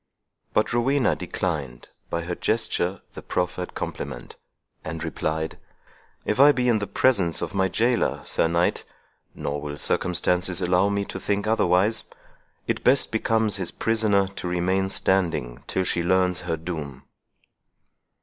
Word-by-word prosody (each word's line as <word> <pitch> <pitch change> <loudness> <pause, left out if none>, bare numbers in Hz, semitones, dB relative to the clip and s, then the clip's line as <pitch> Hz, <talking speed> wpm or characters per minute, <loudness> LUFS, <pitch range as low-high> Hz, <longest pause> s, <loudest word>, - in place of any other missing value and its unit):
But - - +2
Rowena 130 +2 +2
declined, 75 -9 -4 0.2
by 85 0 -2
her 90 +1 -3
gesture, 95 -3 -1
the - - -8
proffered 90 0 -3
compliment, 65 -3 -6 0.5
and 80 0 -5
replied, 80 0 -3 0.7
"If 105 - -1
I 145 +2 +9
be 125 -3 0
in 115 -3 +3
the 105 - -3
presence 100 -5 +2
of - - -4
my 95 -1 +2
jailor, 115 +6 +1
Sir - - +1
Knight—nor 80 -3 -3
will 75 -1 -5
circumstances 90 +2 0
allow 90 +2 +2
me 100 0 -1
to - - -6
think 100 0 -1
otherwise—it 105 0 -1
best 135 +2 +4
becomes 110 -1 +1
his 95 -3 +1
prisoner 110 -3 +1
to 95 -2 -6
remain 95 +2 0
standing 85 -12 0
till 95 - 0
she 90 - 0
learns 90 +1 +2
her 80 - 0
doom." 75 -5 -6
90 Hz, 135 wpm, -25 LUFS, 85-105 Hz, 0.7 s, I